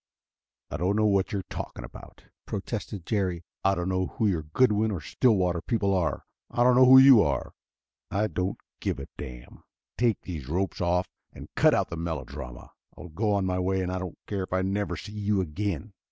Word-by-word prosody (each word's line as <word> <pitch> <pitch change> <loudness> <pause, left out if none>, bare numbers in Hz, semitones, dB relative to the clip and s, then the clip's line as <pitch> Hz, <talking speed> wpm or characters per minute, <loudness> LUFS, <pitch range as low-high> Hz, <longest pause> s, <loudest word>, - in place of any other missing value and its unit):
"I - - -2
don't 95 +4 +1
know 110 0 +3
what 100 -1 +2
you 100 -3 -1
are - - -21
talking - - -6
about," - - -13 0.2
protested 100 -2 -5
Jerry. 95 -6 -1 0.2
"I 95 0 +3
don't 90 0 -2
know 95 0 0
who 115 - -2
your 90 -5 +1
Goodwin 105 +7 +2
or 100 -5 -2
Stillwater 90 0 +1
people 100 -3 0
are. 85 -6 0 0.2
I 120 - +1
don't 125 0 +5
know 130 0 +7
who 130 +1 +10
you 130 -4 +9
are 75 -6 -1 0.6
I 105 +2 +1
don't 95 0 -2 0.2
give - - -2
a - - -6
damn. - - -9 0.4
Take 115 -4 +2
these 80 -6 -7
ropes 90 +2 -1
off 90 +1 +1 0.2
and - - -12
cut - - +5
out - - 0
the 85 - -4
melodrama. 80 -7 -6 0.3
I'll 90 - -9
go 105 +7 -1
on 100 -2 +1
my 90 0 0
way, 95 +1 0
and 90 - -2
I 95 - -2
don't 90 -2 -6
care 100 -2 -3
if 95 - -5
I 95 0 +1
never 100 +2 -1
see 105 - -8
you 105 -1 0
again." 95 +3 -3
95 Hz, 205 wpm, -27 LUFS, 90-105 Hz, 0.6 s, who